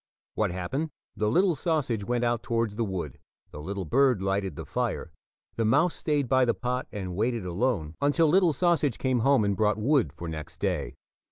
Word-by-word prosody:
What 110 -2 0
happened? 105 - -3 0.3
The 105 0 0
little 180 - +3
sausage 140 - -1
went 120 +3 -1
out 120 -1 +1
towards 115 -4 -1
the 115 - 0
wood, 90 - -4 0.3
the 75 - -8
little 95 +3 -4
bird 130 - +3
lighted 95 -3 -1
the - - -7
fire, - - -2 0.5
the 115 - +1
mouse 160 +10 +3
stayed 145 -4 -1
by 130 +1 +4
the 120 -2 +2
pot 125 +1 -2
and 95 -4 -5
waited 115 0 -1
alone 90 -4 -1
until 145 +3 +3
little 180 +2 +4
sausage 155 -4 +1
came 130 -2 +1
home 130 -2 +3
and 100 -1 +1
brought 105 +1 +2
wood 120 - +2
for 85 +3 -8
next 80 -2 -6
day. - - -2
115 Hz, 190 wpm, -27 LUFS, 95-140 Hz, 0.5 s, by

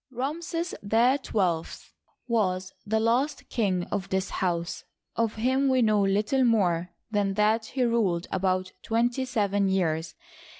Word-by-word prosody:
Ramses 320 +6 -3
XII 220 - +2 0.7
was 185 -5 0
the 220 +1 +1
last 245 +6 0
king 190 -7 0
of 195 -2 -2
this 190 0 -1
house. 170 -2 -2 0.3
Of 230 -1 0
him 260 +5 +1
we 260 -2 +3
know 215 -2 +3
little 210 +7 +2
more 180 -7 +2 0.2
than 200 -2 0
that 215 +2 +2
he 255 +1 -1
ruled 210 -8 +1
about 185 0 0
twenty 240 +3 0
seven 205 -5 +1
years. 165 -4 0
210 Hz, 130 wpm, -27 LUFS, 190-245 Hz, 0.7 s, we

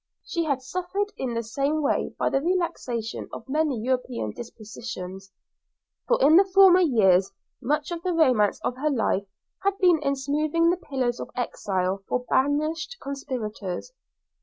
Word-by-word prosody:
She 335 -2 -1
had 275 -4 -1
suffered 365 +8 -3
in 250 -3 -3
the 230 - -1
same 280 +7 -1
way 280 - 0
by - - 0
the 270 - +1
relaxation 290 -10 -2
of - - -9
many 295 -3 0
European 250 - -2
despotisms, 210 - -8 0.8
for - - +3
in 330 +6 +7
former 380 -1 +6
years 195 - +4 0.3
much 300 +4 -1
of 340 -1 -4
the 365 - -1
romance 255 -11 +3
of 250 - -2
her 300 +3 0
life 220 -7 0 0.4
had 395 0 +1
been 355 -4 +4
in 280 -1 +1
smoothing 305 +5 +1
the 360 - 0
pillow 265 -8 -1
of - - -6
exile 195 -5 -2
for 250 0 -1
banished 310 - 0
conspirators. 250 - -5
275 Hz, 150 wpm, -25 LUFS, 230-330 Hz, 0.8 s, in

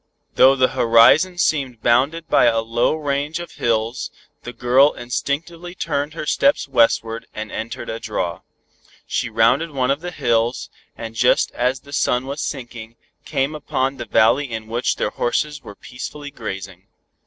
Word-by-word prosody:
Though 135 +1 +6
the 130 -1 +3
horizon 130 +9 +5
seemed 135 -9 0
bounded 140 +8 +2
by - - +4
a 115 -1 +3
low 115 +5 0
range 145 +1 -2
of 175 - -8
hills, 115 +1 -1 0.3
the 120 - -7
girl 130 +4 +3
instinctively 165 +8 -4
turned 150 -3 -2
her 160 - -5
steps 280 - +2
westward, 115 -3 +1
and 110 0 -6
entered 115 +1 -5
a 115 - -4
draw. 90 -6 -3 0.6
She - - -2
rounded 130 +9 +2
one 135 -3 0
of 140 +3 -1
the 180 - -5
hills, 120 -6 -1 0.3
and 115 -1 -7
just 120 +2 +2
as 125 +2 -1
the 140 - -14
sun 125 -2 +1
was 140 +2 -5
sinking, 120 -4 -6 0.3
came 135 +3 -1
upon 135 -2 -2
the 120 - -6
valley 130 +7 +3
in 110 -1 -5
which 115 +3 -1
their - - -2
horses 145 +4 -1
were 105 - -11
peacefully 145 +6 -8
grazing. 95 -5 -7
125 Hz, 160 wpm, -20 LUFS, 115-145 Hz, 0.6 s, Though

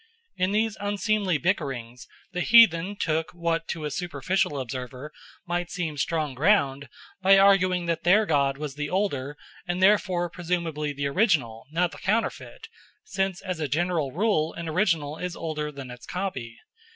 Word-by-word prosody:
In 185 +1 0
these 220 +1 0
unseemly 205 -3 0
bickerings 135 - -2 0.2
the 180 -1 -2
heathen 205 -4 +6
took 160 -4 -1
what 165 -1 -1
to 160 -2 -4
a 150 - -3
superficial 180 -2 -1
observer 130 +3 -6 0.3
might 175 0 -2
seem 165 -4 -3
strong 155 -1 -1
ground 140 -3 +2 0.3
by 195 +1 +6
arguing 185 -2 +4
that 165 -1 -1
their 205 +5 +5
god 140 -5 +1
was 150 -1 -5
the 145 +1 -4
older 150 -7 -1 0.3
and 175 +1 -1
therefore 185 -3 +3
presumably 170 -4 -2
the 140 0 -4
original, 140 - +1
not 170 +1 +1
the - - -11
counterfeit, 225 - -2 0.4
since 190 - -2
as 185 -3 -4
a 155 - -1
general 160 -1 0
rule 170 -3 +1
an 170 -1 -6
original 160 -4 0
is 180 -1 -4
older 155 -2 -4
than 135 -3 -9
its 125 0 -11
copy. 130 -12 -4
170 Hz, 155 wpm, -26 LUFS, 145-185 Hz, 0.4 s, heathen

